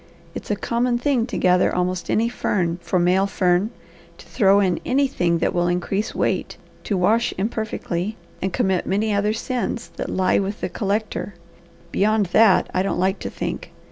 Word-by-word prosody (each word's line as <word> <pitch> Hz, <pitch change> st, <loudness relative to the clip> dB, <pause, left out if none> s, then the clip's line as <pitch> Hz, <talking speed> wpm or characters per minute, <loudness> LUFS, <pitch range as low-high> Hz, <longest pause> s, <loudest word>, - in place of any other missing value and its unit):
It's -, -, -8 dB
a 210 Hz, -, +1 dB
common 240 Hz, +3 st, 0 dB
thing 245 Hz, -2 st, +1 dB
to 250 Hz, -, -4 dB
gather 180 Hz, 0 st, +3 dB
almost 180 Hz, 0 st, -1 dB
any 225 Hz, +2 st, +2 dB
fern 180 Hz, -7 st, -1 dB
for 170 Hz, +2 st, -1 dB
male 180 Hz, +3 st, +3 dB
fern; 185 Hz, +1 st, +1 dB, 0.5 s
to -, -, -14 dB
throw 200 Hz, -3 st, +3 dB
in 185 Hz, -4 st, +1 dB
anything 250 Hz, -11 st, +1 dB
that -, -, 0 dB
will 175 Hz, 0 st, +1 dB
increase 195 Hz, +5 st, -1 dB
weight, -, -, -1 dB, 0.3 s
to 200 Hz, -, 0 dB
wash 225 Hz, +6 st, +2 dB
imperfectly, 215 Hz, -2 st, -3 dB, 0.2 s
and 190 Hz, -, -1 dB
commit 190 Hz, 0 st, 0 dB
many 210 Hz, +3 st, +1 dB
other 205 Hz, +1 st, +1 dB
sins 240 Hz, 0 st, -3 dB
that -, -, -4 dB
lie 185 Hz, 0 st, +2 dB
with 200 Hz, +2 st, -3 dB
the -, -, -3 dB
collector; 205 Hz, -1 st, -2 dB, 0.6 s
beyond 215 Hz, +2 st, +2 dB
that 220 Hz, -4 st, +5 dB
I 185 Hz, -, +2 dB
don't 195 Hz, -, -1 dB
like 190 Hz, +2 st, +1 dB
to -, -, -4 dB
think. -, -, -5 dB
200 Hz, 170 wpm, -22 LUFS, 180-220 Hz, 0.6 s, that